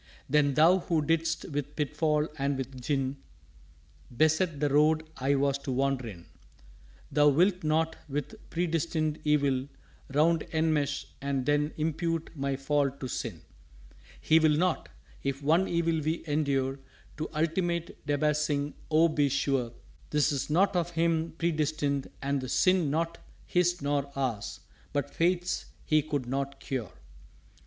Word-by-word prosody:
"_Then 145 -2 +3
Thou 170 +6 +6
who 165 -3 0
didst 165 +1 0
with 145 0 -3
pitfall 150 +1 +1
and 140 0 0
with 130 -1 -6
gin 135 0 -1 1.0
Beset 155 +1 +2
the 145 - +2
Road 155 +2 +3
I 135 +2 +1
was 140 0 +1
to 140 - -4
wander 135 -1 0
in, 90 -6 -9 0.9
Thou 150 0 +5
wilt 180 +5 +3
not 160 +1 +1
with 145 0 -3 0.2
Predestined 165 -2 -1
Evil 140 -3 +2 0.4
round 160 +4 +3
Enmesh, 155 -3 +1 0.2
and 140 -2 -1
then 145 +1 +2
impute 165 +1 -1
my 140 -1 -1
fall 140 +1 +1
to 135 -1 -7
sin._" 110 -9 -4 0.8
"He 160 - +4
will 155 -2 +4
not. 180 0 0 0.3
If 140 +1 -3
one 165 +6 +3
evil 165 -1 +1
we 155 +3 -2
endure 140 -3 0 0.4
To 155 - -3
ultimate 170 +2 -1
Debasing, 150 0 +1 0.2
oh, 160 +1 +5
be 150 -3 +1
sure 135 -3 0 0.4
'Tis 145 -2 +1
not 185 +6 +3
of 175 -1 +1
Him 165 -1 0
predestined, 155 -4 0
and 140 0 0
the 130 - -5
sin 185 +1 +3
Not 165 +3 -1 0.3
His 175 -3 +1
nor 140 -1 0
ours 125 -7 -3 0.3
but 145 -1 -2
Fate's 180 +1 0 0.2
He 155 0 +4
could 145 -3 -3
not 135 +2 -3
cure." 130 - -4
150 Hz, 140 wpm, -29 LUFS, 140-160 Hz, 1.0 s, Thou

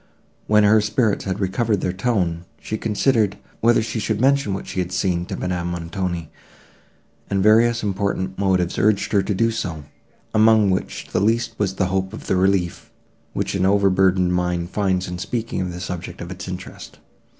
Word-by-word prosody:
When 105 0 +5
her 105 +1 +5
spirits 105 0 0
had 95 -1 -2
recovered 100 +2 0
their 90 - -1
tone, 95 -5 -1
she 110 - -4
considered, 110 -1 +1 0.2
whether 115 0 +3
she 115 0 -3
should 110 0 -1
mention 135 -5 +2
what 95 - -6
she - - -4
had 90 0 -2
seen 90 -1 0
to - - -4
Madame 90 -1 -2
Montoni, 85 -1 -4 1.0
and 95 -1 +1
various 115 +2 +4
and 105 - 0
important 95 -1 -2
motives 95 -3 +1
urged 105 -1 +2
her 100 -2 +4
to 100 +1 -2
do 115 +4 +2
so, 90 -9 -4 0.5
among 110 -2 +5
which 95 - -3
the - - +1
least 115 +3 +1
was 95 -2 0
the 95 - +1
hope 95 +1 -1
of 110 - -8
the - - +1
relief, 95 -2 0 0.4
which - - -2
an 95 -2 0
overburdened 95 -2 +3
mind 90 0 -1
finds 95 -3 0
in 90 0 -5
speaking 115 +1 -3
of 90 -1 -3
the 90 - -7
subject 90 -1 -6
of 85 +1 -7
its 90 -1 -7
interest. 90 +1 -8
95 Hz, 185 wpm, -21 LUFS, 90-110 Hz, 1.0 s, When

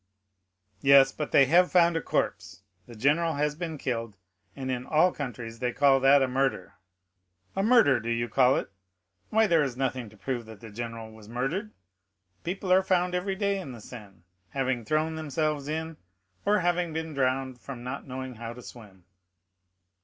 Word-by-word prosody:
"Yes, 135 -1 +7
but 150 +1 -5
they 140 - +6
have 175 +6 +4
found 170 -2 +4
a 165 - 0
corpse; 90 -8 -2 0.2
the 120 - -11
general 150 +7 +2
has 150 +1 0
been 160 0 -5
killed, 115 -6 -4 0.4
and 130 -1 -4
in 125 -1 -2
all 165 +4 +4
countries 120 -6 -6
they 125 -1 -1
call 135 0 +4
that 135 +1 +5
a - - +1
murder." 130 -7 -1 0.8
"A 195 - +1
murder 210 - +5
do 115 +1 -5
you 115 0 0
call 130 +2 +4
it? - - -3 0.6
why, 220 +1 +4
there 170 -6 +3
is 135 -4 -2
nothing 130 -3 -2
to 110 - -18
prove 120 +2 -4
that 110 -2 -11
the 110 0 -11
general 115 0 -6
was 110 -1 -14
murdered. 135 - -2 0.7
People 185 +1 -1
are 190 - +6
found 180 -1 +1
every 185 +2 -1
day 200 0 0
in 140 -9 -7
the 120 - -10
Seine, 105 -6 -12 0.3
having 130 -3 -1
thrown 155 +4 0
themselves 155 -2 -2
in, 160 +1 -4 0.5
or 210 -1 +3
having 175 -1 0
been 160 0 -4
drowned 130 -1 -1
from 130 -3 -8
not 130 +3 -6
knowing 130 0 -6
how 115 0 -7
to 125 +1 -12
swim." 100 -8 -13
135 Hz, 180 wpm, -27 LUFS, 120-160 Hz, 0.8 s, Yes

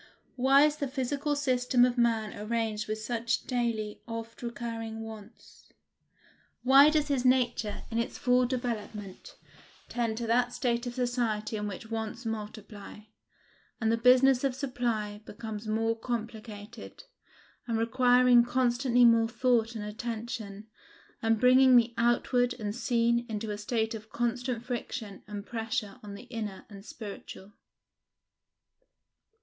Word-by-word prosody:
Why 270 +2 +5
is 300 0 +2
the 285 -2 -2
physical 280 +3 -1
system 250 -3 +3
of 250 -1 0
man 230 -3 +1
arranged 220 0 -2
with 215 0 -2
such 230 +1 -2
daily, 230 -4 -2
oft 230 0 -7
recurring 230 -2 -5
wants? 220 0 -12 0.9
Why 275 +3 +8
does 305 -1 +1
his 270 -3 +1
nature, 245 -4 +1
in 230 - 0
its 235 - -3
full 250 0 +3
development, 220 -6 -5 0.5
tend 230 -2 -1
to 235 - -3
that 245 +2 +2
state 240 -1 -1
of 240 - -5
society 240 -4 -1
in 210 -1 -3
which 205 +3 -8
wants 225 +2 -4
multiply, 215 -1 -7 0.8
and 220 -1 +1
the - - +3
business 250 +2 +5
of 270 -2 0
supply 235 -6 -2
becomes 220 0 -7
more 225 +1 +1
complicated, 225 - -7 0.6
and 230 -1 0
requiring 245 +1 +5
constantly 245 0 +2
more 230 -1 +5
thought 235 -1 +1
and 210 -2 -4
attention, 215 -2 -5 0.6
and 225 -2 +2
bringing 255 +1 +6
the 235 0 +4
outward 245 +1 +2
and 210 -3 -4
seen 235 -1 +1
into 215 0 -3
a 205 - -4
state 220 +1 -1
of 215 -1 -8
constant 240 +1 -2
friction 230 -4 -5
and 205 -1 -6
pressure 225 -3 -3
on 205 -1 -8
the 200 - -10
inner 215 -5 -6
and 200 0 -12
spiritual? 205 -2 -9
230 Hz, 135 wpm, -29 LUFS, 220-245 Hz, 0.9 s, Why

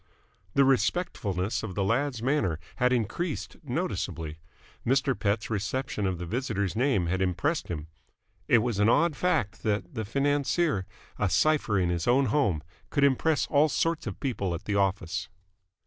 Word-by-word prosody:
The 140 - +6
respectfulness 110 - 0
of 100 -5 -6
the 100 - +1
lad's 120 +3 0
manner 130 - +1 0.2
had 125 0 +3
increased 130 - -2
noticeably. 80 -1 -3 0.4
Mr. 135 +2 +2
Pett's 105 -1 -1
reception 105 +1 -1
of 95 -2 -1
the 90 - -5
visitor's 105 -2 -2
name 120 -6 +2
had 95 +3 -1
impressed 120 - 0
him. 75 -4 -4 0.6
It 115 -3 +5
was 120 -5 -1
an 105 +2 +4
odd 155 +5 +3
fact 115 - 0
that 105 +8 -1
the 110 -3 -3
financier, 140 - +1 0.3
a - - +2
cipher 150 -9 +2
in 90 -2 +2
his 85 -1 -1
own 130 +3 +4
home, 100 - +2 0.3
could 140 - +1
impress 140 +2 +3
all 150 +2 +3
sorts 165 +2 0
of - - -5
people 100 - -1
at 85 - -8
the 105 - -1
office. 90 -3 0
115 Hz, 160 wpm, -28 LUFS, 95-140 Hz, 0.6 s, The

